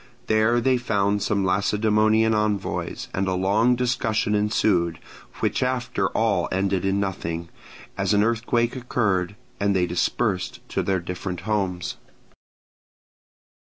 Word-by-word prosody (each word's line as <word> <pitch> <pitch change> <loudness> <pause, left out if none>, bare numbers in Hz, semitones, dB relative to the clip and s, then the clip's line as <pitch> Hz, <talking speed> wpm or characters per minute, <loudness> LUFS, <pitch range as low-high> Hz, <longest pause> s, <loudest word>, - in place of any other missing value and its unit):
There 110 +2 +3
they 130 +2 +2
found 105 -4 0
some 100 -1 0
Lacedaemonian 110 +3 +2
envoys; 105 -2 -1
and 95 +1 -1
a 95 - 0
long 105 +7 +3
discussion 115 -3 0
ensued, 100 -5 +1 0.4
which - - 0
after 130 -1 0
all - - +1
ended 95 0 0
in 95 +1 +1
nothing, 85 -4 -3 0.5
as - - +1
an 105 -1 +4
earthquake 115 +1 0
occurred, 105 -7 -1 0.2
and 100 0 +1
they 90 -1 +3
dispersed 90 +2 -1
to - - -1
their 95 -1 0
different 90 0 -5
homes. 95 -4 -2
105 Hz, 125 wpm, -24 LUFS, 95-110 Hz, 0.5 s, an